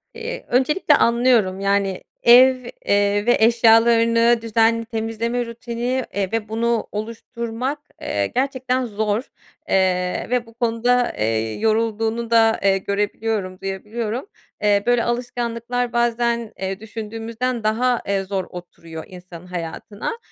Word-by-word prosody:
Eee, 465 Hz, +1 st, -6 dB
öncelikle 290 Hz, +5 st, +3 dB
anlıyorum. 235 Hz, -5 st, +3 dB
Yani, 195 Hz, -1 st, 0 dB, 0.2 s
ev, 255 Hz, +2 st, +8 dB, 0.3 s
eee, 205 Hz, +1 st, +2 dB
ve 240 Hz, -, +4 dB
eşyalarını 230 Hz, +1 st, +4 dB
düzenli 230 Hz, 0 st, +2 dB
temizleme 230 Hz, +2 st, -2 dB
rutini, 235 Hz, +2 st, -3 dB
eee, 195 Hz, -1 st, -2 dB
ve 220 Hz, -2 st, -2 dB
bunu 230 Hz, 0 st, 0 dB
oluşturmak, 230 Hz, +5 st, -4 dB, 0.2 s
eee, 100 Hz, -1 st, -1 dB
gerçekten 260 Hz, -1 st, -1 dB
zor, 215 Hz, 0 st, -1 dB, 0.5 s
eee, 180 Hz, -1 st, +1 dB
ve 245 Hz, -1 st, 0 dB
bu 230 Hz, -, -17 dB
konuda, 240 Hz, +1 st, +1 dB
eee, 110 Hz, 0 st, 0 dB
yorulduğunu 225 Hz, +1 st, 0 dB
da, 225 Hz, -1 st, +4 dB
eee, 195 Hz, -1 st, +4 dB
görebiliyorum, 200 Hz, -1 st, -2 dB
duyabiliyorum. 215 Hz, -, -4 dB, 0.4 s
Eee, 205 Hz, -1 st, +3 dB
böyle 245 Hz, -1 st, +3 dB
alışkanlıklar 240 Hz, 0 st, -2 dB
bazen, 235 Hz, -1 st, 0 dB
eee, 190 Hz, 0 st, -3 dB
düşündüğümüzden 225 Hz, +2 st, -4 dB
daha, 235 Hz, +3 st, +1 dB
eee, 195 Hz, -1 st, 0 dB
zor 190 Hz, -1 st, -3 dB
oturuyor 165 Hz, -2 st, -9 dB
insanın 180 Hz, -1 st, -12 dB
hayatına. 180 Hz, -, -5 dB
225 Hz, 120 wpm, -21 LUFS, 200-240 Hz, 0.5 s, ev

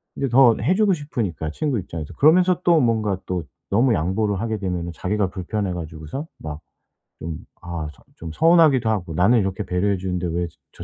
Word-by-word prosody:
이제 135 Hz, -, -1 dB
더 120 Hz, -2 st, +6 dB
해주고 190 Hz, -, +3 dB
싶으니까 105 Hz, -, -3 dB
친구 140 Hz, -, -1 dB
입장에서 85 Hz, -5 st, -7 dB
그러면서 180 Hz, +4 st, +4 dB
또 170 Hz, -2 st, +5 dB
뭔가 110 Hz, -6 st, +1 dB
또 90 Hz, -2 st, -2 dB, 0.3 s
너무 115 Hz, +4 st, +3 dB
양보를 95 Hz, +4 st, 0 dB
하게 110 Hz, 0 st, -2 dB
되면은 90 Hz, -3 st, -3 dB
자기가 100 Hz, +3 st, -1 dB
불편해 95 Hz, +1 st, -3 dB
가지고서 80 Hz, -, -6 dB
막 75 Hz, 0 st, -7 dB, 0.6 s
좀 80 Hz, -1 st, -5 dB, 0.2 s
아 85 Hz, -3 st, -5 dB
좀 -, -, -23 dB
좀 80 Hz, -1 st, -8 dB
서운하기도 160 Hz, -, +4 dB
하고 95 Hz, -6 st, -2 dB
'나는 95 Hz, +9 st, +4 dB
이렇게 95 Hz, 0 st, -2 dB
배려해 90 Hz, +3 st, 0 dB
주는데 90 Hz, -1 st, -2 dB
왜 85 Hz, +1 st, -1 dB
저 85 Hz, -, -14 dB
100 Hz, 380 characters per minute, -22 LUFS, 85-125 Hz, 0.6 s, 더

